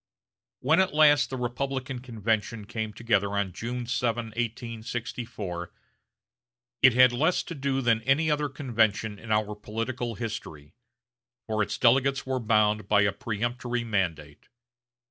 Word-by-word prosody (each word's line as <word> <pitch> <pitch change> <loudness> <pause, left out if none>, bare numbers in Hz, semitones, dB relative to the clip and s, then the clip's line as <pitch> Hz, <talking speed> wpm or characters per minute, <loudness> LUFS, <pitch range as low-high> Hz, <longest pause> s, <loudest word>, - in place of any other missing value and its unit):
When 160 +7 +3
at 190 -5 +2
last 150 -2 +5
the 130 - -4
Republican 130 +1 -3
convention 110 -2 -2
came 110 +1 -4
together 105 -3 0
on 100 -3 -1
June 120 +4 -4
7, 120 -2 -1
1864, 115 -5 -5 1.1
it 130 - +7
had 125 0 +7
less 155 +9 +1
to - - -7
do 135 -2 -1
than 115 -3 +2
any 140 +6 +2
other 150 -1 0
convention 110 -6 0
in 115 - -8
our 105 0 +1
political 115 +3 -4
history; 90 -10 -6 0.7
for 110 -1 -1
its 105 - -1
delegates 135 +3 +3
were 130 -1 -1
bound 105 -2 +2
by 105 0 +4
a 100 - +2
peremptory 120 +1 -3
mandate. 85 -9 -3
115 Hz, 135 wpm, -27 LUFS, 105-130 Hz, 1.1 s, it